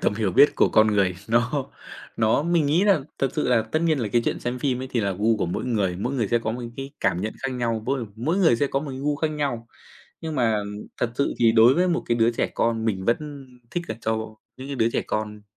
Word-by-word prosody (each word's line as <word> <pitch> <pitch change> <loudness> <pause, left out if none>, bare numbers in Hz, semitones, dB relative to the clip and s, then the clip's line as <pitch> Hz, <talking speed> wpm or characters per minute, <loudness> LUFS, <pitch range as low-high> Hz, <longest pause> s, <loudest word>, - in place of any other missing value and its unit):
tầm - - +1
hiểu 105 -3 0
biết 145 - +6
của - - +4
con 110 0 +5
người. 100 -4 +1
Nó 120 +5 +1 0.5
nó 110 +4 +2
mình 170 -2 +2
nghĩ 155 +6 +3
nà 195 -6 +4 0.2
thật 135 - +1
sự - - 0
là 120 -3 +3
tất 155 +9 -2
nhiên 160 -4 +2
là 115 - -2
cái 120 -1 +3
chuyện - - -1
xem 120 +1 -3
phim 125 -1 -1
ấy 130 - -5
thì 120 - 0
là 100 -2 0
gu 110 +4 +1
của - - -1
mỗi 85 - -3
người, 100 -7 0
mỗi 120 +8 -3
người 115 -6 0
sẽ 120 - +2
có 115 -1 -3
một 125 +1 -5
cái 135 0 -6
cảm 85 - +1
nhận 110 +3 -3
khác 135 - -1
nhau, 115 -3 -2
mỗi 130 -3 -1
mỗi 150 +11 -1
người 165 -11 +4
sẽ 145 - +1
có 135 0 -1
một 145 -1 -6
cái 130 - -6
gu 145 +1 0
khác 155 +2 0
nhau, 140 -6 -3 0.5
nhưng 160 -1 -5
mà 115 -4 +2 0.4
thật 120 - -1
sự 140 - 0
thì 115 -1 +4
đối 115 +3 +6
với 180 +2 +2
một 175 - 0
cái 120 - +1
đứa 115 0 +3
trẻ - - 0
con 115 -1 0
mình 95 -4 -1
vẫn 140 +4 -2 0.3
thích 175 -1 -3
là - - -3
cho 110 -1 -3 0.2
những 130 +2 -8
cái 140 - -4
đứa 115 -2 +2
trẻ - - 0
con 105 -1 -3
120 Hz, 270 wpm, -24 LUFS, 110-140 Hz, 0.5 s, biết